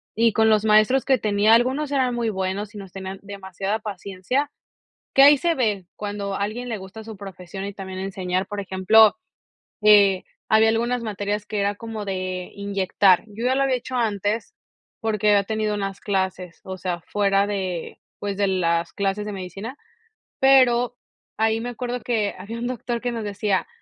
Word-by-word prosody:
Y 230 0 +3
con 220 0 +4
los 215 0 +3
maestros 215 +5 +4
que 265 -3 +3
tenía, 210 +1 +3
algunos 260 +5 +2
eran 260 -3 +1
muy 235 -2 0
buenos 195 +2 -3
y 210 - -8
nos 195 -2 -10
tenían 190 0 -7
demasiada 195 0 -4
paciencia, 205 +6 -3 0.6
que 270 - +6
ahí 285 +1 +9
se 335 +4 +1
ve 210 - 0
cuando 205 -1 -4
a - - -3
alguien 215 +5 -3
le 225 -3 -3
gusta 195 +4 -10
su 220 0 -9
profesión 195 -1 -8
y 200 - -5
también 190 -1 -7
enseñar, 185 -1 -2
por 205 - -5
ejemplo, 200 +3 +5 0.7
eh, 200 -3 +6 0.3
había 220 0 +5
algunas 235 +2 0
materias 205 0 -3
que 210 -1 -3
era 200 +1 0
como 220 -1 -6
de 185 -2 -3
inyectar. 200 -2 +2
Yo 220 +3 -6
ya 255 +1 +3
lo 275 - +2
había 270 -1 +2
hecho 255 +1 -5
antes 215 -2 -1 0.5
porque 215 -2 +1
había 205 -1 +5
tenido 215 0 -1
unas 195 -1 -4
clases, 190 -3 -2
o 190 0 -6
sea, 180 -2 -3
fuera 200 -1 +2
de, 190 -4 -4 0.2
pues, 200 -1 -3
de 200 -1 +2
las 170 -3 0
clases 200 +1 -1
de 210 - -5
medicina, 195 - -7 0.6
pero 250 -2 +5 0.4
ahí 220 +1 +1
me 240 +2 -4
acuerdo 245 +1 -4
que 220 -4 -1
había 210 +5 -7
un 240 - -2
doctor 240 -1 -3
que 245 - -1
nos 230 -2 -4
decía: 205 -1 -1
205 Hz, 180 wpm, -23 LUFS, 195-230 Hz, 0.7 s, ahí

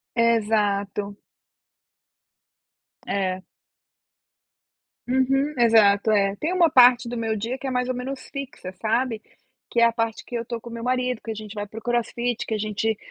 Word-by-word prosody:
Exato. 210 -3 +1 1.9
É. 185 -1 -1 1.6
Uhum, 270 +3 +1
exato, 220 -3 +5
é. 200 -2 +3
Tem 330 +4 -2
uma 345 -3 +4
parte 245 -2 +6
do 240 - -4
meu 225 -1 -1
dia 230 +5 -3
que 270 - -6
é - - -2
mais 250 0 -1
ou 255 - -1
menos 260 +1 -5
fixa, 275 -9 -7
sabe, 225 0 0 0.5
que 235 - +1
é - - +7
a 235 - +5
parte 225 -1 -2
que - - -14
eu 230 0 -3
tô 235 -1 -5
com 235 - -10
o 235 - -9
meu 230 - -6
marido, 250 -1 0
que 225 - -9
a - - -2
gente 215 -1 -8
vai 205 0 -4
pro 220 +2 -9
crossfit, 240 0 -1
que - - -3
a 215 - 0
gente 215 +1 -1
230 Hz, 175 wpm, -24 LUFS, 215-250 Hz, 1.9 s, é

